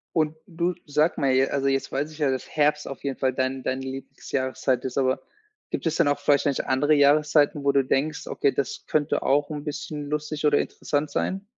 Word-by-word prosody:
Und 155 -1 +1
du, 175 -1 -1
sag 150 +3 +1
mal, 135 -2 +2
j 130 +1 +3
also, 140 -1 0
jetzt 135 0 -1
weiß 145 +3 -1
ich 155 - -13
ja, 145 -3 +2
dass 130 -1 -3
Herbst 150 0 +1
auf 135 - -9
jeden 140 -1 -3
Fall 130 -1 +1
dein 130 0 -1
deine 130 +1 -2
Lieblingsjahreszeit 130 -1 -2
ist, 130 0 -3
aber 130 -1 +1 0.5
gibt - - -3
es 165 0 +1
dann 165 -4 +3
auch 145 - +1
vielleicht 145 -1 +2
nicht 140 -2 0
andere 145 +3 +2
Jahreszeiten, 145 0 +4
wo 140 - +4
du 140 -1 +3
denkst: 145 +4 -1
„Okay, 140 - +1
das 140 - -3
könnte 150 -1 0
auch 145 +2 +2
'n 150 -1 -5
bisschen 150 -1 -5
lustig 150 0 -2
oder 145 -1 +4
interessant 145 +1 -2
sein?“ 195 +1 -2
145 Hz, 215 wpm, -25 LUFS, 135-150 Hz, 0.5 s, Jahreszeiten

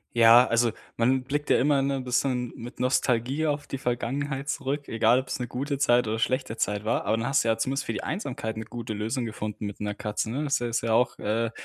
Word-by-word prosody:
Ja, 120 +1 +8
also, 115 0 +2 0.3
man 130 +3 +3
blickt 145 +3 -2
ja - - +5
immer, 140 +1 +3
ne, 140 0 0
'n 130 - -4
bisschen 125 -1 0
mit 120 +2 -9
Nostalgie 125 +3 +1
auf 145 -1 -1
die 135 - -4
Vergangenheit 135 +3 -2
zurück. 140 +2 -2
Egal 115 +2 +4
ob 130 - -6
es - - -3
'ne 125 - -3
gute 140 +4 -3
Zeit 120 -3 +3
oder 110 +1 -1
schlechte 130 -1 -1
Zeit 105 0 -1
war. 115 +2 0
Aber 110 - +2
dann 115 - -2
hast 135 -3 +3
du - - -2
ja 110 0 +2
zumindest 135 +4 -1
für - - -2
die - - -3
Einsamkeit 135 - -4
'ne 110 - -5
gute 115 0 -6
Lösung 115 +4 -2
gefunden 105 -1 -5
mit 100 - -8
'ner 105 0 -2
Katze, 105 +2 -3
ne? 145 +5 -2
Das, 140 -1 +1
äh, 120 - -1
ist 115 - 0
ja 115 -1 0
auch, 125 +2 +2
äh 110 +2 -1
120 Hz, 245 wpm, -27 LUFS, 115-135 Hz, 0.3 s, Ja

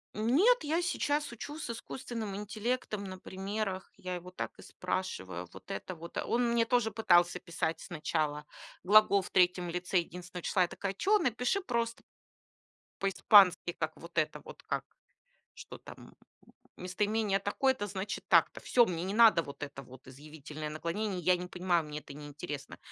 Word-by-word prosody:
Нет, 310 - +4
я 325 +4 +1
сейчас 295 -5 0
учу 290 +6 -7
с 315 - -5
искусственным 230 -3 -5
интеллектом 215 +1 -3
на 185 0 -7
примерах. 195 +1 -4
Я 185 0 -5
его 180 +1 -8
так - - -4
и - - -10
спрашиваю. 95 - -4
Вот 95 -1 -11
это 180 - -5
вот. 170 +1 -9
Он 240 0 +1
мне 235 -1 +3
тоже 235 -2 +2
пытался 175 -5 +4
писать 165 -2 -2
сначала 155 -3 -2 0.4
глагол 200 0 +6
в - - -9
3 180 -1 +3
лице 180 +1 0
единственного 180 +1 -7
числа. 185 - +2
Я - - +1
такая: 195 +2 -4
"Чё, 405 - +3
напиши 250 - 0
просто 235 -6 -2 1.0
по-испански, 195 -2 +5
как 155 - -1
вот 170 0 -8
это 155 - 0
вот, - - -12
как - - -2 0.7
что - - -10
там - - -13 0.6
местоимение 205 +2 0
такое-то, 205 +2 0
значит 195 +1 -4
так-то". - - +4
Всё, 240 -1 +4
мне 170 -4 -3
не 195 - -2
надо 220 -5 +7
вот 145 -2 -8
это 140 -2 -7
вот 130 +2 -15
изъявительное 150 +2 -8
наклонение. 180 +5 -3
Я 180 +1 +4
не 180 - -6
понимаю, 180 -2 0
мне 150 0 -5
это 145 - -12
не 145 +1 -9
интересно. 145 -1 -7
185 Hz, 160 wpm, -31 LUFS, 170-220 Hz, 1.0 s, надо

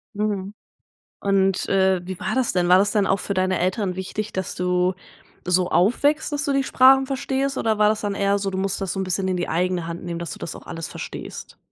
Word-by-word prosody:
Mhm. 205 -1 -2 0.7
Und, 195 -1 +1
äh, 190 -1 +3
wie 185 0 -6
war - - -2
das 260 -2 +1
denn? 175 -1 +1
War 180 +1 +7
das 205 +1 +2
denn 205 -3 +2
auch 195 - +1
für 200 - -3
deine 185 0 +1
Eltern 185 +1 0
wichtig, 200 +3 -5
dass 190 -1 -3
du 180 0 +1 0.5
so 180 0 +1
aufwächst, 290 - +2
dass 290 -1 -1
du 280 - 0
die 275 0 +1
Sprachen 265 +1 +5
verstehst, 275 0 -2
oder 220 -2 0
war 210 0 +5
das 215 0 0
dann 205 -1 -2
eher 200 0 +1
so, 195 0 -2
du 190 - -4
musstest 195 0 -2
das 190 - -2
so 195 - -3
'n 190 - -1
bisschen 190 +1 -1
in 185 - 0
die 175 - -2
eigene 175 +1 0
Hand 170 +1 -6
nehmen, 170 -1 -4
dass 170 - -5
du - - -9
das 165 - -6
auch - - -14
alles 165 -1 -6
verstehst? - - -8
195 Hz, 240 wpm, -23 LUFS, 180-215 Hz, 0.7 s, War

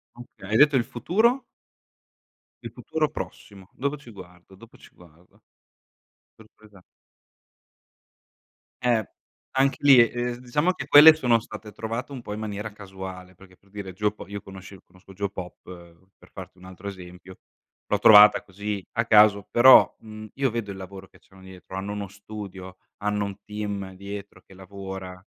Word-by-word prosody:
Okay. 120 -5 -13
Hai 110 - +2
detto 145 +1 +5
il 125 - +3
futuro? 220 - 0 1.2
Il - - -6
futuro 155 -2 -2
prossimo, 100 -9 -9
dopo 140 +3 -3
ci 130 -4 -16
guardo, 90 -2 -15
dopo 115 +4 -17
ci - - -18
guardo. 85 0 -22 0.9
Sorpresa. 105 -3 -20 2.0
Eh. 120 -4 +1 0.5
Anche 135 0 +2
lì, 140 -3 +7
ehm, 120 +1 +1
diciamo 145 +8 0
che - - -8
quelle 155 +2 +9
sono 125 -7 +2
state 110 -1 -11
trovate 115 +5 -5
un 130 - -7
po' 105 - -6
in 105 - -6
maniera 105 0 -5
casuale, 95 -2 -10
perché, 95 0 -19
per 100 - -30
dire 100 -2 -8
geopo 105 +2 -3
io 100 0 -7
conosce 95 -1 -13
conosco 95 +1 -19
Geopop, 95 -2 -6 0.6
per - - -21
farti 95 -1 -11
un 90 - -18
altro 95 +2 -11
esempio, 90 -1 -11 0.5
l'ho 105 - -1
trovata 105 0 +8
così 100 +1 -6
a 115 0 0
caso, 105 -3 +5
però, 130 +2 +7
mhmm, 110 -1 -11
io 135 -1 0
vedo 115 -3 -4
il 95 - -9
lavoro 95 0 -10
che - - -23
c'hanno 95 -1 -20
dietro, 95 0 -12
hanno 100 +2 -5
uno 105 -1 -5
studio, 100 -2 -10 0.3
hanno 105 0 -1
un 100 -1 -7
team 100 -2 -5
dietro 100 +1 -9
che 95 - -19
lavora. 95 -1 -9
100 Hz, 155 wpm, -24 LUFS, 95-115 Hz, 2.0 s, quelle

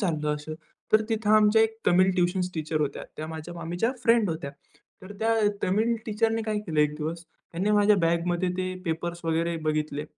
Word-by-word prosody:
चाललं 155 -6 0
असं. 150 +1 -7 0.4
तर 215 0 +6
तिथं 215 -1 0
आमच्या 215 +1 +5
एक 225 0 0
तमिळ 185 +2 +5
ट्युशन्स 180 0 0
टीचर 155 -1 -2
होत्या. 140 -2 -2
त्या 155 - -5
माझ्या 160 +2 -7
मामीच्या 175 +7 -2
फ्रेंड 230 -4 +4
होत्या. 160 -3 -4 0.5
तर 185 +2 -9
त्या 225 +1 +2 0.3
तमिळ 215 +5 +2
टीचरने 225 +1 0
काय 215 -1 -1
केलं 160 -7 -1
एक 150 0 +2
दिवस, 165 +2 -4 0.3
त्यांनी 185 +5 0
माझ्या 205 0 +5
बॅगमध्ये 170 +1 +1
ते 185 0 -2
पेपर्स 170 +1 -3
वगैरे 165 +1 0
बघितले. 150 -1 -1
175 Hz, 175 wpm, -26 LUFS, 160-210 Hz, 0.5 s, तर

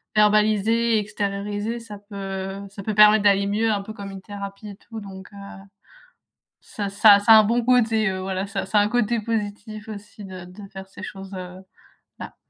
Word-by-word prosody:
verbaliser, 215 +2 +3
extérioriser, 205 +2 -3
ça 210 -3 -10
peut 195 -1 -6
ça 200 - -9
peut 215 +1 -3
permettre 210 0 +7
d'aller 200 -1 +4
mieux, 215 +2 +1
un 200 -1 -1
peu 215 - -8
comme 200 -2 -8
une 195 -1 -9
thérapie 200 +1 -8
et 200 - -9
tout 225 +1 -10
donc 190 -2 -10
heu, - - -12 1.3
ça 205 -2 -5
ça 200 +1 +6
ça 215 +2 +5
a 220 - +10
un - - +3
bon 235 +3 +1
côté, 225 -3 +3
heu, 185 0 -4
voilà. 190 +1 -3
Ça 195 -1 -4
ça 195 +3 +1
a - - +5
un 205 - +1
côté 235 0 0
positif 215 0 -4
aussi 210 0 -10
de 185 -2 -9
de 195 +2 -12
faire 190 0 -9
ces - - -12
choses, 195 0 -8
heu, 180 0 -8 0.6
là. - - -8
205 Hz, 195 wpm, -23 LUFS, 195-215 Hz, 1.3 s, a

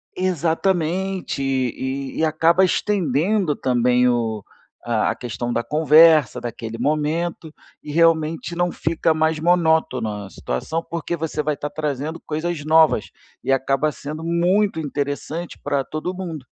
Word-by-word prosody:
Exatamente, 180 0 -1
e 130 +1 -2
e 160 - +3
acaba 165 +3 +3
estendendo 180 -2 +1
também 125 0 +2
o 115 -4 0 0.5
a 110 -2 +1
questão 120 0 -4
da 120 - 0
conversa, 155 -3 +5
daquele 115 -1 -6
momento, 155 +4 -1 0.3
e 150 - -7
realmente 165 +1 +2
não 175 0 0
fica 160 0 0
mais 160 0 +1
monótona 155 - +1
a - - -14
situação, 95 - -3
porque 170 +1 -4
você 155 -1 -3
vai 150 0 0
estar 145 - -5
trazendo 150 +2 -4
coisas 155 0 -3
novas 155 -6 +4 0.4
e - - 0
acaba 135 +3 +1
sendo 150 +2 -7
muito 175 +3 +1
interessante 145 +3 -4
pra 140 -1 -1
todo 155 +6 -4
mundo. 170 -7 -6
155 Hz, 130 wpm, -21 LUFS, 135-170 Hz, 0.5 s, conversa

